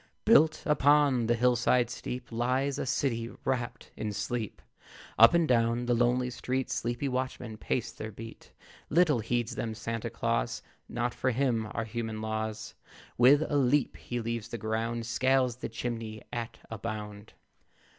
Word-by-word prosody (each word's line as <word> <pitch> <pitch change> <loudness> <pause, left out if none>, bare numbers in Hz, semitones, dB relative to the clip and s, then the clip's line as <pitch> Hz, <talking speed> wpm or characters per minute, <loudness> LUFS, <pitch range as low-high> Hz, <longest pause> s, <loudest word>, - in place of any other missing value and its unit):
Built 160 -9 +5
upon 145 -5 +4
a 120 - +4
hill 125 +1 +3
side 120 +1 +2
steep 125 0 -6
Lies 130 +4 0
a - - -2
city 115 -3 0 0.2
wrapt 125 -3 -2
in 110 -1 -3
sleep. 110 +1 -3 0.6
Up 115 +7 +9
and 170 -2 +3
down 120 -1 +2
the 120 - +2
lonely 125 +1 +2
street 130 +2 -2
Sleepy 120 +4 -1
watchmen 130 -3 -3
pace 115 +2 -2
their 110 - -7
beat. 115 +2 -11 0.4
Little 155 -4 +4
heeds 120 +1 -1
them 115 -2 -3
Santa 115 0 -4
Claus; - - -1 0.3
Not 120 0 -1
for 130 - 0
him 120 -3 0
are 115 - -3
human 110 -1 -4
laws. 110 0 -4 0.4
With 140 +5 +6
a 145 - 0
leap 140 +1 +2
he 120 - -5
leaves 115 -1 -3
the 120 0 -5
ground, 115 +2 -2
Scales 130 0 +2
the - - -5
chimney 115 -2 -5
at 120 -1 -4
a 110 - -5
bound. 105 -1 -6
120 Hz, 155 wpm, -29 LUFS, 115-130 Hz, 0.6 s, Up